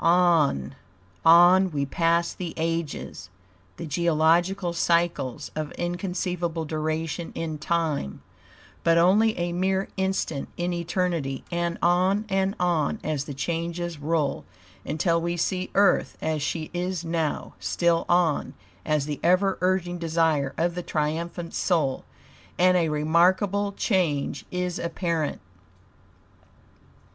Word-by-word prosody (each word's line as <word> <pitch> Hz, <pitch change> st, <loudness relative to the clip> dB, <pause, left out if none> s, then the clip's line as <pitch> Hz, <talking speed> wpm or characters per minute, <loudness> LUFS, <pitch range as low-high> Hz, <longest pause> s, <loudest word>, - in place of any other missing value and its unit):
On, 165 Hz, -, +3 dB, 0.5 s
on 175 Hz, +3 st, +7 dB
we 145 Hz, -4 st, -1 dB
pass 170 Hz, +4 st, +1 dB
the 175 Hz, -3 st, -6 dB
ages, 165 Hz, -, -3 dB, 0.5 s
the -, -, -6 dB
geological 170 Hz, +3 st, +2 dB
cycles 170 Hz, -5 st, 0 dB
of 155 Hz, -1 st, -3 dB
inconceivable 175 Hz, -2 st, -3 dB
duration 155 Hz, +2 st, -3 dB
in 155 Hz, -2 st, -4 dB
time, 155 Hz, -, -2 dB, 0.6 s
but 165 Hz, 0 st, +4 dB
only 205 Hz, +6 st, +4 dB
a 175 Hz, 0 st, -2 dB
mere 190 Hz, +2 st, 0 dB
instant 190 Hz, -6 st, -1 dB
in 175 Hz, +1 st, -1 dB
eternity; 170 Hz, -5 st, -2 dB
and 170 Hz, 0 st, -1 dB
on 185 Hz, +4 st, +3 dB
and 195 Hz, +1 st, 0 dB
on, 175 Hz, +3 st, +1 dB
as 150 Hz, -3 st, -2 dB
the 145 Hz, -, -7 dB
changes 170 Hz, +2 st, -3 dB
roll, 150 Hz, -1 st, -1 dB, 0.4 s
until 165 Hz, +3 st, 0 dB
we 170 Hz, +1 st, -2 dB
see 185 Hz, +2 st, -1 dB
Earth 200 Hz, -2 st, +3 dB
as 155 Hz, -1 st, -1 dB
she 155 Hz, +2 st, -3 dB
is 175 Hz, -1 st, -3 dB
now; 165 Hz, -2 st, -2 dB
still 170 Hz, -1 st, +1 dB
on, 175 Hz, -4 st, +2 dB, 0.3 s
at 150 Hz, -2 st, +1 dB
the 145 Hz, 0 st, -4 dB
ever 185 Hz, +3 st, +2 dB
urging 180 Hz, -1 st, 0 dB
desire 160 Hz, -4 st, +1 dB
of 170 Hz, +1 st, +1 dB
the 180 Hz, -, -4 dB
triumphant 170 Hz, +2 st, -3 dB
Soul, 155 Hz, -8 st, 0 dB, 0.5 s
and 185 Hz, +1 st, +4 dB
a 170 Hz, -3 st, +2 dB
remarkable 180 Hz, +7 st, +2 dB
change 175 Hz, -10 st, -1 dB
is 180 Hz, -1 st, -2 dB
apparent. 170 Hz, -2 st, -2 dB
170 Hz, 120 wpm, -25 LUFS, 155-180 Hz, 0.6 s, on